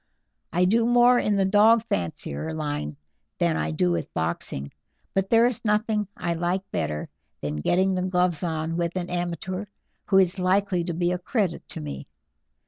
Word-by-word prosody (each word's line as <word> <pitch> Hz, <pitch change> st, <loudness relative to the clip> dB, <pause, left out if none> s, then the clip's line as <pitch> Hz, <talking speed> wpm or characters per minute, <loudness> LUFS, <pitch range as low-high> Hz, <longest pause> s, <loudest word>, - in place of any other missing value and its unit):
I 180 Hz, +2 st, +3 dB
do 225 Hz, +5 st, +3 dB
more 245 Hz, +1 st, +5 dB
in 210 Hz, -, +1 dB
the 195 Hz, -1 st, +2 dB
dog 215 Hz, +3 st, +5 dB
fancier 90 Hz, -, -3 dB
line 145 Hz, -, -3 dB, 0.4 s
than 85 Hz, -2 st, +2 dB
I 75 Hz, 0 st, -1 dB
do 85 Hz, +3 st, +1 dB
with 85 Hz, -2 st, -2 dB
boxing, 80 Hz, -4 st, -3 dB, 0.4 s
but 195 Hz, 0 st, 0 dB
there 230 Hz, 0 st, +5 dB
is 245 Hz, -2 st, -1 dB
nothing 210 Hz, -1 st, +1 dB
I 170 Hz, -7 st, -1 dB
like 175 Hz, +3 st, -1 dB
better 75 Hz, 0 st, -2 dB, 0.3 s
than 75 Hz, 0 st, -3 dB
getting 185 Hz, -, +2 dB
the 185 Hz, -, 0 dB
gloves 180 Hz, -3 st, +1 dB
on 165 Hz, -1 st, -2 dB
with 170 Hz, 0 st, -1 dB
an 180 Hz, -1 st, -3 dB
amateur 175 Hz, +2 st, -3 dB, 0.4 s
who 195 Hz, -, +3 dB
is 190 Hz, 0 st, +3 dB
likely 185 Hz, -1 st, +2 dB
to 175 Hz, -, -2 dB
be 175 Hz, +1 st, +1 dB
a 180 Hz, -, -1 dB
credit 190 Hz, -2 st, -1 dB
to -, -, -6 dB
me. 70 Hz, -2 st, -6 dB
180 Hz, 175 wpm, -25 LUFS, 150-200 Hz, 0.4 s, more